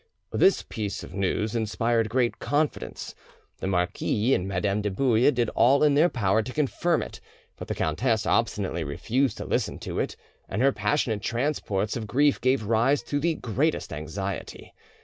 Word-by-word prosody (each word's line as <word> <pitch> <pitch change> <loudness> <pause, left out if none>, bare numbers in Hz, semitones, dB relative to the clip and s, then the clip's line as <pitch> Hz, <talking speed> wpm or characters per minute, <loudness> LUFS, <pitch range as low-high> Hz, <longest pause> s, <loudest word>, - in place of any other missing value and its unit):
This 195 - +3
piece 105 -3 -4
of - - -10
news 100 +2 -1
inspired 115 0 0
great 120 +1 0
confidence. 145 +1 -2 0.5
The - - -3
marquis 95 +6 +1
and 90 -5 0
Madame 100 +2 0
de 105 - -1
Bouille 120 +4 +3
did 120 -5 +1
all 140 +4 +4
in 150 -1 +5
their 155 +5 +4
power 110 - +1
to 110 - -6
confirm 155 +4 0
it, - - -10 0.3
but - - -8
the - - -3
countess 110 - 0
obstinately 100 -7 0
refused 115 - -1
to - - -5
listen - - -1
to - - -4
it, - - -2 0.3
and 95 - -3
her 135 +2 +4
passionate 125 -8 0
transports 115 -4 -1
of 110 -3 -4
grief 145 +6 +2
gave 130 -2 +2
rise 115 +6 +2
to 145 - -2
the 165 +2 +1
greatest 140 +7 -1
anxiety. 95 +6 -6
115 Hz, 170 wpm, -26 LUFS, 100-135 Hz, 0.5 s, in